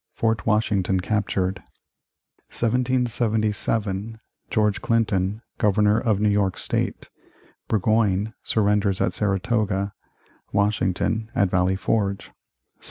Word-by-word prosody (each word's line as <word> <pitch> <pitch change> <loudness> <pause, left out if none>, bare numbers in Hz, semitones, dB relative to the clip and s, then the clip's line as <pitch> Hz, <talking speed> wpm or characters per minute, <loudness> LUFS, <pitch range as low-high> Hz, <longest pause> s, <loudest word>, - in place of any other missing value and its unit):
Fort 115 -1 0
Washington 105 -4 +2
captured 100 -1 -1 0.9
1777. 110 -4 0 0.3
George 105 -2 +1
Clinton, 105 -2 0 0.2
Governor 105 +1 +3
of 110 -4 +1
New 105 - +2
York 100 -2 +1
State - - -3 0.6
Burgoyne 110 0 +1
surrenders 105 -2 +1
at 90 - +1
Saratoga 100 0 0 0.6
Washington 105 +2 0
at 100 -2 +2
Valley 95 +1 +2
Forge 100 0 -1
1780. - - -33
105 Hz, 95 wpm, -24 LUFS, 95-110 Hz, 0.9 s, Governor